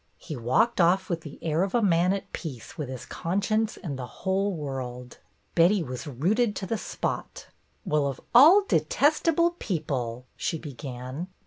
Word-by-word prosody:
He 155 - -7
walked 130 - +2
off 185 +3 +3
with 170 -1 -1
the 150 -3 -10
air 160 0 +1
of 195 +2 0
a 240 - +4
man 180 -1 +3
at 195 0 -4
peace 135 -9 -7
with 150 -4 -5
his 130 -2 -6
conscience 205 +5 -1
and 140 -6 -5
the 125 - -5 0.2
whole 195 +2 +1
world. 130 -6 -6 0.3
Betty 175 +3 +4
was 125 +1 -6
rooted 200 - +1
to 195 - -4
the 225 - -1
spot. - - -4 0.4
"Well, 150 -2 +1
of 135 - -4
all 320 +12 +8
detestable 335 -6 +2
people 125 - -3
!" - - -42
she 165 - -2
began. 135 +1 -6
165 Hz, 165 wpm, -27 LUFS, 135-200 Hz, 0.4 s, all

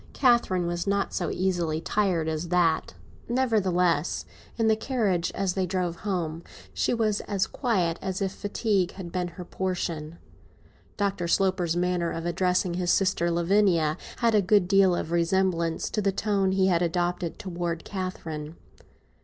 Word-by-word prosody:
Catherine 235 -9 +3
was 175 +2 -2
not 200 0 0
so 175 - -1
easily 175 -4 0
tired 180 -3 0
as 160 +2 -2
that. 170 -2 +1 0.3
Nevertheless, 185 - +1 0.3
in 225 -1 +2
the 220 - +4
carriage, 215 -8 0
as 190 -2 0
they 185 -1 -1
drove 180 -2 -2
home, 170 -5 -3 0.3
she - - 0
was 220 -3 +1
as 200 -2 +1
quiet 180 - 0
as 190 -1 -3
if 195 -2 -1
fatigue 205 -2 -1
had 180 -3 -8
been 180 0 -1
her 175 +1 -9
portion. 170 -4 -3 0.8
Dr. 195 -4 -1
Sloper's 180 -2 +1
manner 175 -1 0
of 165 0 -4
addressing 180 +1 +1
his 175 0 -1
sister 185 -3 +2
Lavinia 170 -2 +2 0.2
had 235 -2 +2
a 210 - +5
good 195 -1 +3
deal 195 -2 +4
of 165 - -3
resemblance 170 -1 +1
to 215 - 0
the 200 -1 +2
tone 195 -1 0
he 190 0 +3
had 175 -3 +3
adopted 175 0 -1
towards 170 -3 -4
Catherine. 165 -5 -5
180 Hz, 155 wpm, -26 LUFS, 170-195 Hz, 0.8 s, a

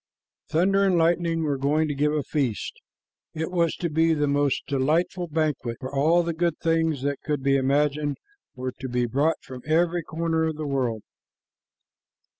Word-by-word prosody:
Thunder 195 +5 +3
and 190 -3 +3
Lightning 165 0 +2
were 145 -3 -1
going 150 +3 +2
to 145 - -2
give 145 +2 +1
a 150 -1 0
feast. 130 -8 -2 0.6
It 160 +2 -3
was 170 -3 +1
to 175 - -2
be 165 +1 +2
a 150 -2 +1
most 145 -1 +1
delightful 165 +6 0
banquet, 150 -7 -1
for 130 +1 -7
all 160 +5 +3
the 170 0 -2
good 170 -1 0
things 160 -4 0
that 140 0 -2
could 150 -3 -2
be 135 0 +3
imagined 145 +2 +1 0.4
were 130 0 -4
to 130 - -5
be 125 0 0
brought 140 +7 +1
from 130 -1 -9
every 170 +3 +2
corner 160 0 -1
of 160 -1 -2
the 155 0 -5
world. 125 -6 -1
150 Hz, 175 wpm, -25 LUFS, 140-165 Hz, 0.6 s, Thunder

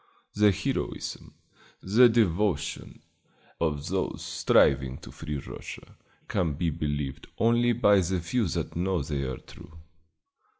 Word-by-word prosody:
The 105 0 +5
heroism, 95 - -4 0.5
the 115 +6 +6
devotion, 100 -7 0 0.6
of 75 -3 -1
those - - -2
striving 65 -1 +3
to - - -12
free 75 -2 -5
Russia 70 - -9 0.3
can 80 -4 0
be 80 +3 -1
believed 75 -3 -3
only 120 +1 +3
by 105 -3 +4
the 90 0 0
few 100 +6 0
that - - -3
know 90 -2 0
they 70 0 -3
are 65 -2 -3
true. 80 +1 -14
85 Hz, 125 wpm, -27 LUFS, 75-105 Hz, 0.6 s, the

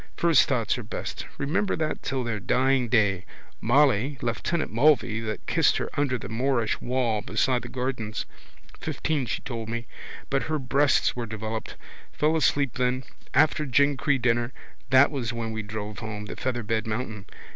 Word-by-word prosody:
First 165 -6 +5
thoughts - - +1
are - - -6
best. - - -5
Remember 160 +9 0
that 155 -1 -2
till 135 -2 -2
their 115 -3 -2
dying 130 +3 +2
day. 105 -6 +3 0.4
Molly, 135 +1 +3
lieutenant 120 +5 -1
Mulvey 120 -3 +3
that 110 -1 -4
kissed - - +3
her - - -3
under 140 -3 +1
the - - -7
Moorish 120 0 0
wall 120 -4 0
beside 120 +4 +1
the - - -8
gardens. 125 -4 -3 0.5
Fifteen 145 -6 -1
she - - -3
told 115 -3 -5
me. 115 +1 -3 0.5
But 135 0 +2
her 155 - +1
breasts 140 +1 +2
were 120 -2 -3
developed. 110 +1 -5 0.4
Fell 155 +2 +1
asleep 140 -4 +1
then. 125 +1 +1 0.3
After 155 0 +4
Glencree 140 +1 +2
dinner 120 0 +1 0.4
that 130 +2 +6
was 125 -5 -2
when 115 -1 -3
we 110 0 -3
drove 105 -1 -6
home. 110 -2 -5
Featherbed 115 -1 -2
mountain. 110 -2 -4
125 Hz, 155 wpm, -26 LUFS, 110-140 Hz, 0.5 s, that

